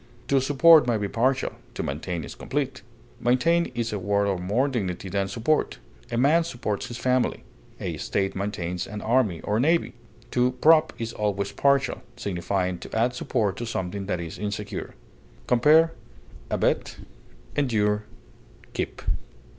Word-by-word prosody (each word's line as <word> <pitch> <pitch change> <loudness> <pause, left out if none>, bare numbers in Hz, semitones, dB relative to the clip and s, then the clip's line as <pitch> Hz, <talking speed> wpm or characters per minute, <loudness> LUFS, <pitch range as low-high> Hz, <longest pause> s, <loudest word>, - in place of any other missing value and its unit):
To 135 -1 +4
support 145 +2 +6
may 120 -2 +2
be 105 -1 -2
partial, 130 +6 +1 0.2
to - - -2
maintain 80 +4 -3
is - - -7
complete; 135 0 -3 0.4
maintain 165 +8 +3
is 115 -2 -2
a 105 - -2
word 100 +2 +1
of 95 -3 -1
more 110 +10 +1
dignity 95 -8 -3
than 100 +1 0
support; 115 +10 0 0.3
a 115 - -2
man 150 +7 +4
supports 120 -10 -3
his 120 - -6
family; 125 0 +1 0.4
a - - -3
state 95 -1 -1
maintains 90 -3 -3
an 105 -1 -6
army 110 -8 +2
or 105 +2 0
navy. 165 +6 +2 0.4
To 125 0 +2
prop 155 +5 +5
is 115 0 -4
always 100 -2 -1
partial, 140 -1 +2 0.2
signifying 90 -1 -2
to - - -8
add 120 +2 +2
support 110 -5 -1
to 120 - -4
something 95 -2 -3
that 90 -4 -1
is 85 -2 -6
insecure. 105 -1 -4 0.5
Compare 150 +7 +5 0.6
ABET; - - 0 0.6
ENDURE; 105 -6 +1 0.7
KEEP. - - -4
115 Hz, 145 wpm, -25 LUFS, 100-130 Hz, 0.7 s, support